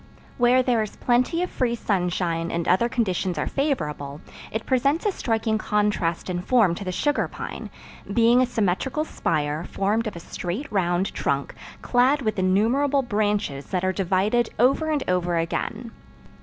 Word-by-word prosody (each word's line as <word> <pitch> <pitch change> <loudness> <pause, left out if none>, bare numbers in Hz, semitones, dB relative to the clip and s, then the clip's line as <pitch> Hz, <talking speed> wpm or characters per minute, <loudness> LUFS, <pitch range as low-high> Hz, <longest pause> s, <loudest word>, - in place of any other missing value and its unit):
Where 245 +1 +5
there 245 -3 +2
is 215 - -5
plenty 255 +8 +1
of 360 - -4
free 240 -2 0
sunshine 175 -5 -1
and 170 0 -2
other 210 +7 +3
conditions 190 -7 -1
are 150 - 0
favorable, 150 - -2 0.3
it 220 +1 -3
presents 275 - +1
a 415 - +3
striking 225 - -1
contrast 210 -6 0
in 175 -1 -2
form 215 -3 +3
to 185 - -6
the 185 - -3
sugar 290 - 0
pine, - - -7 0.4
being 235 +3 +4
a 255 - +2
symmetrical 240 - -1
spire, 155 - -1
formed 210 +5 -1
of 210 - -5
a - - -6
straight 185 - -5
round 180 -1 0
trunk, 140 0 -1 0.3
clad 260 +3 +3
with 215 -3 -1
innumerable 240 +10 +2
branches 205 - -1
that 185 0 -1
are 185 - +1
divided 200 +5 +1
over 275 +7 +3
and 300 -3 0
over 175 -1 +1
again. 220 +7 -3
210 Hz, 160 wpm, -24 LUFS, 180-245 Hz, 0.4 s, Where